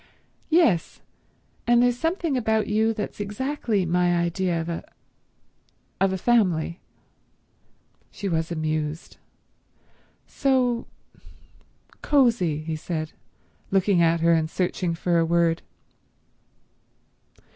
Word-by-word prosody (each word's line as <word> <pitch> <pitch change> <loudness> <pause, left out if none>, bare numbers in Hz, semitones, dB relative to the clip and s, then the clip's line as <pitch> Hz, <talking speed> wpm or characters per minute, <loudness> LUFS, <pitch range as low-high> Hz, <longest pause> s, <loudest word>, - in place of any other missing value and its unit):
"Yes. 310 - +2 0.7
And 240 0 +5
there's 245 -1 +3
something 330 -2 -1
about 220 -3 +1
you 220 +2 +1
that's 210 -2 -5
exactly 210 -1 -2
my 175 +1 +2
idea 170 0 0
of 165 - -4
a—of 185 +2 -7
a 190 - -1
family." 180 -7 +1 1.3
She 200 - -6
was 165 -2 -1
amused. 155 0 -3 1.1
"So—cosy," 245 - -2
he 160 0 -3
said, 155 0 -4 0.6
looking 195 -2 +2
at 165 0 +3
her 170 0 +4
and 160 -1 +1
searching 180 -1 -1
for 170 0 +1
a - - +3
word. 170 0 +2
180 Hz, 95 wpm, -24 LUFS, 165-230 Hz, 1.3 s, And